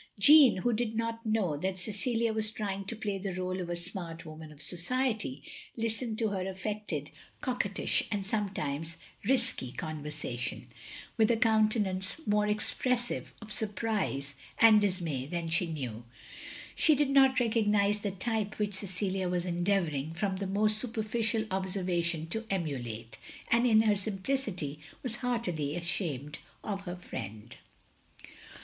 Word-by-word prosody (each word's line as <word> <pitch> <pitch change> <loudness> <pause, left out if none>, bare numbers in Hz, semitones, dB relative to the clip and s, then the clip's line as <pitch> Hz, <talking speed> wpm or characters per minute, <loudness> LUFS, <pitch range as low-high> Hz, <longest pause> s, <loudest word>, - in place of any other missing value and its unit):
Jeanne, 285 +1 +8
who 240 - +3
did 225 0 -1
not 230 0 -2
know 215 -8 +1
that 185 +4 -2
Cecilia 225 +4 0
was 220 -1 +1
trying 200 -3 -3
to 230 - -3
play 205 -2 -2
the 195 +1 -3
r61e 185 +1 -2
of 175 - -5
a 175 - -1
smart 170 -1 -6
woman 155 0 -9
of 150 - -14
society, 180 - -1 0.3
listened 225 0 -1
to 220 -1 +1
her 190 -1 -2
affected, 190 -6 -4 0.3
coquettish, 235 -6 +1
and 200 -2 -1
sometimes 165 -7 -2 0.3
risquie 235 - +1
conversation, 150 -5 -4 0.5
with 220 -2 +5
a 235 - +4
countenance 215 -2 +2
more 210 0 +3
expressive 240 +3 0
of 215 - -9
surprise 205 -10 -1 0.2
and 220 -2 +8
dismay 170 -10 -1
than 170 +1 -3
she 165 +2 +2
knew. 125 -7 -4 0.7
She 310 - +5
did 285 -1 +2
not 270 -1 +6
recognise 210 -3 +2
the 205 - -1
type 210 +2 -2
which 210 -1 -1
Cecilia 190 -1 -2
was 175 0 0
endeavouring, 175 -5 0
from 190 +1 -1
the 195 0 -3
most 210 +2 +2
superficial 225 -1 0
observa 190 -3 -1
tion, 165 -2 -1
to 225 +5 -2
emulate; 120 - -3 0.3
and 235 +2 +4
in 220 -2 +6
her 215 -2 +4
simplicity, 195 - -2 0.2
was 240 -3 -3
heartily 180 - -1
ashamed 160 -5 -2 0.2
of 200 -2 -3
her 175 -1 -4
friend. 105 - -7
200 Hz, 145 wpm, -31 LUFS, 170-220 Hz, 0.7 s, Jeanne